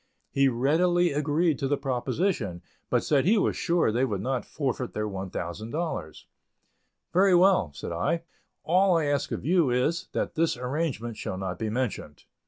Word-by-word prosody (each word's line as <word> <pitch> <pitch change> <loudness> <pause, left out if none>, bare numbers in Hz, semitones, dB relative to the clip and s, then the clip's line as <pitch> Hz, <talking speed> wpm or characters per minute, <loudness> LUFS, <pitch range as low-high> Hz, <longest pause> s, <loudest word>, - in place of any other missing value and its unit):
He 140 0 +3
readily 165 +8 +2
agreed 150 +2 +1
to 135 - 0
the 145 +1 +1
proposition, 125 - -1 0.3
but - - +2
said 140 -3 +2
he 215 +5 +4
was 200 - +1
sure 170 -8 +1
they 120 +4 +1
would 105 -7 -1
not 130 +2 -2
forfeit 130 -4 -3
their 105 0 -1
$1,000. 95 - -4 0.9
"Very 185 +1 +5
well," 180 - +4
said - - -6
I; 165 - -1 0.4
"all 180 +1 +4
I 160 - +1
ask 145 -1 0
of - - -4
you 170 -3 +3
is, 125 +7 0
that - - -2
this 160 -4 +1
arrangement 125 -4 -3
shall 95 - -4
not 95 -2 -4
be 110 - -2
mentioned." 110 - -3
135 Hz, 165 wpm, -27 LUFS, 110-170 Hz, 0.9 s, Very